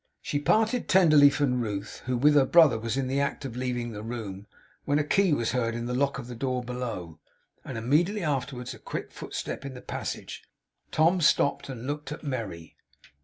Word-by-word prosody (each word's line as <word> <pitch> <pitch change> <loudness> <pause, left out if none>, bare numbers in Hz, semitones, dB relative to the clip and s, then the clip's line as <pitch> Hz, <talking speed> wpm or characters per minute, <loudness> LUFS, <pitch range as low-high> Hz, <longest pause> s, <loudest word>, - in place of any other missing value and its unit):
She 145 - -2
parted 220 +10 +1
tenderly 155 -6 +7
from 135 -3 0
Ruth, 105 -2 -4
who 125 -1 0
with 145 +4 +5
her 140 -2 +5
brother 155 -9 +6
was 115 +2 -2
in 135 - 0
the 135 +2 0
act 140 0 -2
of 125 -3 -6
leaving 125 -2 -2
the 105 -1 -7
room, 105 -4 -6 0.4
when 145 - +1
a 150 - +2
key 185 +5 +2
was 120 -6 +1
heard 115 -2 0
in 120 0 -3
the 125 - -3
lock 140 +2 +1
of 135 - -6
the 125 - -8
door 125 +1 -2
below, 115 -10 -5 0.4
and 125 - -6
immediately 165 - +1
afterwards 135 -4 -2
a - - -13
quick - - -6
footstep - - -5
in 135 -2 -7
the - - -8
passage. - - -5 0.5
Tom 170 +3 +3
stopped, 140 -2 +2
and 125 -2 -6
looked 145 +1 -4
at 150 - -7
Merry. 110 - -5
130 Hz, 200 wpm, -27 LUFS, 120-145 Hz, 0.5 s, tenderly